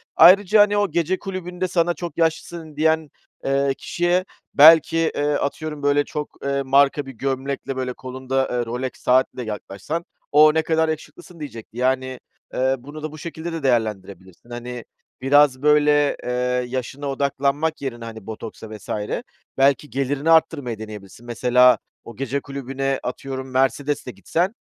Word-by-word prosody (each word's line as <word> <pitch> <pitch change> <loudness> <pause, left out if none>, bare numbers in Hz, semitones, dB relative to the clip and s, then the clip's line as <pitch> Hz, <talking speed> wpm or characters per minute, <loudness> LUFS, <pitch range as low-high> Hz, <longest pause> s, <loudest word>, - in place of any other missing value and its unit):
Ayrıca, 200 +5 +7
hani, 205 0 +3
o 205 -4 +1
gece 170 +3 0
kulübünde 185 -2 -4
sana 175 -1 +1
“çok 170 +2 -7
yaşlısın“ 165 -1 -2
diyen, 160 0 +1 0.4
eee, 135 0 +1
kişiye 175 +5 0 0.3
belki, 160 +2 +7 0.2
eee, 145 +1 0
atıyorum 150 +1 -3
böyle 145 0 +3
çok, 150 0 -5
eee, 140 0 0
marka 140 +1 +3
bir 135 - -8
gömlekle, 135 +2 -3
böyle, 130 -1 -3
kolunda, 130 +1 -2
eee, 120 -1 -1
Rolex 125 +3 -3
saatle 125 0 +1
yaklaşsan, 105 - -5 0.3
“O, 150 +1 +7
ne 160 - +2
kadar 160 0 +1
yakışıklısın.“ 160 +2 -7
diyecekti. 115 -6 -9
Yani, 130 0 0 0.3
eee, 130 +1 +1
bunu 145 +4 -10
da 155 - -4
bu 155 - -10
şekilde 165 +1 -6
de 165 -3 -5
değerlendirebilirsin. 105 -4 -2
Hani, 120 0 -6 0.4
biraz 135 0 +4
böyle, 150 -1 +4
eee, - - -4 0.4
yaşına 130 +3 -4
odaklanmak 140 +3 -1
yerine, 120 -4 -5
hani, 110 -2 -9
botoksa 110 0 -8
vs. 105 -3 -11 0.7
belki 140 +2 +3
gelirini 140 +3 -1
arttırmayı 145 -8 +2
deneyebilirsin. 105 0 -10
Mesela 125 +1 +4 0.3
o 115 - -11
gece 135 +3 -2
kulübüne, 135 0 -3
atıyorum, 130 +1 -5
Mercedes'le 135 +2 0
gitsen 160 - -2
140 Hz, 145 wpm, -22 LUFS, 125-155 Hz, 0.7 s, Ayrıca